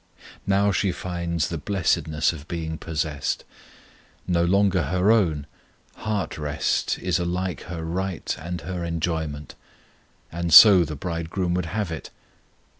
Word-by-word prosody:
Now 100 Hz, +1 st, +3 dB
she 100 Hz, 0 st, +1 dB
finds 85 Hz, -2 st, -3 dB
the 85 Hz, -, -4 dB
blessedness 80 Hz, -3 st, 0 dB
of 75 Hz, -1 st, -10 dB
being 80 Hz, -2 st, -4 dB
possessed. 80 Hz, -3 st, -2 dB, 0.8 s
No 85 Hz, -2 st, +2 dB
longer 95 Hz, -1 st, +2 dB
her 90 Hz, +7 st, +2 dB
own, 85 Hz, -10 st, +2 dB, 0.5 s
heart 105 Hz, -8 st, -3 dB
rest 75 Hz, 0 st, -1 dB
is 90 Hz, -2 st, -1 dB
alike 90 Hz, +1 st, -2 dB
her 85 Hz, -3 st, -6 dB
right 90 Hz, 0 st, -3 dB
and 85 Hz, +3 st, -5 dB
her 90 Hz, -2 st, -5 dB
enjoyment; 80 Hz, -3 st, -3 dB, 0.8 s
and 85 Hz, 0 st, -3 dB
so 95 Hz, +2 st, +10 dB
the 75 Hz, 0 st, -6 dB
Bridegroom 85 Hz, +3 st, -3 dB
would 90 Hz, -1 st, -1 dB
have 105 Hz, 0 st, -3 dB
it. 80 Hz, -, -6 dB
85 Hz, 130 wpm, -24 LUFS, 80-95 Hz, 0.8 s, so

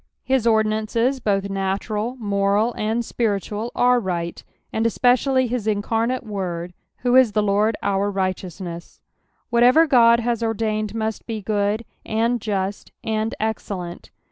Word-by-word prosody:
His 260 Hz, -3 st, +1 dB
ordinances 220 Hz, +4 st, +1 dB
both 200 Hz, -4 st, 0 dB
natural, 200 Hz, +4 st, -2 dB
moni, 205 Hz, +1 st, +1 dB
and 225 Hz, +2 st, -1 dB
spiritual, 215 Hz, 0 st, -2 dB
are 250 Hz, 0 st, +4 dB
right, 175 Hz, -5 st, -3 dB, 0.3 s
and 225 Hz, +1 st, +1 dB
especially 255 Hz, +3 st, +3 dB
his 240 Hz, -3 st, -3 dB
incarnate 225 Hz, +4 st, 0 dB
Word, 180 Hz, -5 st, -4 dB, 0.3 s
who 245 Hz, 0 st, +2 dB
is 255 Hz, -5 st, +6 dB
the 210 Hz, -, +2 dB
Lord 210 Hz, +2 st, +2 dB
our 200 Hz, 0 st, +1 dB
righteousness. 185 Hz, -3 st, -4 dB, 0.5 s
Whatever 245 Hz, +7 st, +6 dB
God 235 Hz, -5 st, +5 dB
has 235 Hz, -1 st, -1 dB
ordained 215 Hz, -1 st, -1 dB
must 220 Hz, -1 st, -3 dB
be 225 Hz, -2 st, -3 dB
good, 210 Hz, +2 st, -1 dB, 0.2 s
and 230 Hz, +2 st, 0 dB
just, 200 Hz, -1 st, -3 dB
and 220 Hz, 0 st, -1 dB
excellent. 195 Hz, -5 st, -4 dB
220 Hz, 130 wpm, -22 LUFS, 200-235 Hz, 0.5 s, is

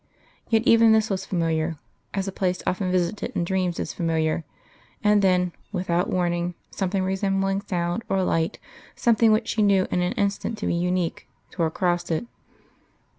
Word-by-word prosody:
Yet 225 Hz, -1 st, +3 dB
even 230 Hz, -2 st, +6 dB
this 220 Hz, -1 st, +2 dB
was 190 Hz, -, -2 dB
familiar, 165 Hz, -2 st, 0 dB, 0.4 s
as 195 Hz, 0 st, -1 dB
a -, -, -2 dB
place 185 Hz, -1 st, -1 dB
often 185 Hz, 0 st, 0 dB
visited 185 Hz, +3 st, -1 dB
in -, -, +1 dB
dreams 180 Hz, -1 st, -1 dB
is -, -, -3 dB
familiar; 160 Hz, -1 st, 0 dB, 0.6 s
and 210 Hz, -1 st, +4 dB
then, 180 Hz, -2 st, +3 dB, 0.2 s
without 180 Hz, -2 st, 0 dB
warning, 175 Hz, -1 st, 0 dB, 0.2 s
something 190 Hz, 0 st, -1 dB
resembling 195 Hz, +1 st, 0 dB
sound 175 Hz, 0 st, -2 dB
or 190 Hz, -1 st, +1 dB
light, 165 Hz, -2 st, 0 dB, 0.4 s
something 230 Hz, -1 st, +4 dB
which 220 Hz, +1 st, +1 dB
she 220 Hz, -, 0 dB
knew 200 Hz, -2 st, +4 dB
in 180 Hz, -, +1 dB
an 180 Hz, -, 0 dB
instant 200 Hz, +2 st, -1 dB
to -, -, -4 dB
be -, -, +1 dB
unique, 180 Hz, 0 st, -1 dB, 0.2 s
tore 170 Hz, -3 st, 0 dB
across 175 Hz, +1 st, -1 dB
it.... 165 Hz, +8 st, -1 dB
185 Hz, 165 wpm, -24 LUFS, 175-200 Hz, 0.6 s, even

